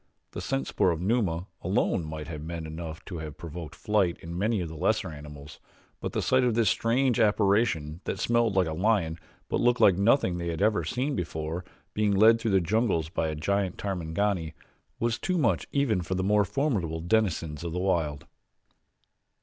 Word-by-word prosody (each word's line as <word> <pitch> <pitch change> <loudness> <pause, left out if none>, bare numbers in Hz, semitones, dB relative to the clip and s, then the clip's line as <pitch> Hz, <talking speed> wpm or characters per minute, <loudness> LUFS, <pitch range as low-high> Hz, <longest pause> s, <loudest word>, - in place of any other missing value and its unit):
The - - -6
scent 65 0 -1
spoor 90 - +1
of 85 -2 -1
Numa, 95 -4 0 0.2
alone, 95 -1 +1
might 75 0 -6
have 80 -2 -6
been 85 -1 -5
enough 80 +1 -7
to 90 -4 -6
have 75 -2 -7
provoked 85 -1 -8
flight 100 -5 +1
in 85 +1 -7
many 105 +4 +1
of 85 - -2
the 80 - -8
lesser 75 - 0
animals, 75 -1 -10 0.4
but - - -4
the - - -1
sight 130 0 +3
of 120 -3 +2
this 115 -4 +3
strange 125 +2 +1
apparition 100 -7 +2
that - - -2
smelled 120 -3 +1
like 95 -1 +4
a 80 - -3
lion, 90 -3 +1 0.3
but - - -1
looked 120 +1 +3
like 95 -2 +5
nothing 100 -4 +3
they 85 0 -3
ever 100 +6 +1
had - - -4
seen 135 +3 -1
before, 80 0 -3 0.3
being 105 -1 +1
led 115 +3 +6
through 115 - 0
the 95 -2 +4
jungles 95 -4 +1
by 80 -2 -1
a 80 - -3
giant 95 +4 -1
Tarmangani 90 -2 -2 0.4
was 115 -1 0
too 185 -1 -1
much 125 -9 +1
for - - -38
even 140 -9 +2
the 95 +2 -2
more 105 +1 +3
formidable 95 - -1
denizens 85 -5 0
of 85 - -3
the 85 - -3
wild. 80 -6 0
90 Hz, 190 wpm, -28 LUFS, 80-110 Hz, 0.4 s, led